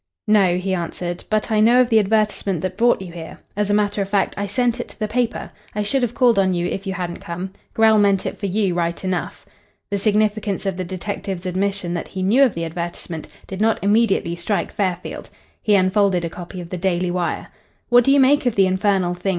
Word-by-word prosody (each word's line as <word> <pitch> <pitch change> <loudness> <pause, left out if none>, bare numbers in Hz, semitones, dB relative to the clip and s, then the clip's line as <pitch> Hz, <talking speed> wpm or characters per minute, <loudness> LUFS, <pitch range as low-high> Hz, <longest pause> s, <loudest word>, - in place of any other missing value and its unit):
"No," 200 -4 +4
he 190 +1 -2
answered, 175 0 -4
"but 215 0 0
I 215 - +3
know 235 +3 +5
of 250 -1 +3
the 220 - +6
advertisement 210 -4 0
that 185 0 -3
brought 240 -3 +2
you 180 - -9
here. 165 -1 -9 0.2
As 205 0 -1
a - - +2
matter 205 -1 +1
of 195 - -3
fact, 200 -1 +1
I 200 0 -3
sent 245 +1 0
it - - -4
to - - -16
the 215 - -1
paper. 235 +1 -2 0.2
I 210 - 0
should 265 +6 +1
have 245 -1 -1
called 240 -5 +4
on 190 -1 +2
you 175 0 -1
if 195 +2 -4
you 190 - -1
hadn't 175 -2 -4
come. 180 +3 -6 0.2
Grell 220 -1 +5
meant 200 -2 +3
it - - -4
for 200 - -2
you, 195 -1 0
right 170 0 -2
enough." 185 -1 -3 0.5
The 200 - 0
significance 210 -1 0
of 195 -2 -1
the 185 - -2
detective's 190 0 -5
admission 185 -1 -1
that 175 - -4
he 185 - -5
knew 220 +8 +3
of 265 -5 +4
the 165 0 -2
advertisement 170 -1 -6 0.2
did 190 +1 -6
not 225 0 +3
immediately 200 -5 +2
strike 170 +1 -2
Fairfield. 185 -3 -3 0.3
He 210 - +3
unfolded 185 -2 +2
a 165 - -5
copy 180 +1 -8
of 170 - -10
the 180 - -3
Daily 180 -1 0
Wire. 180 -1 -2 0.4
"What 245 0 +6
do 275 - +3
you 280 - +5
make 270 0 +4
of 240 - 0
the 195 - +5
infernal 190 -1 +1
thing?" 180 +2 -3
195 Hz, 230 wpm, -21 LUFS, 180-215 Hz, 0.5 s, the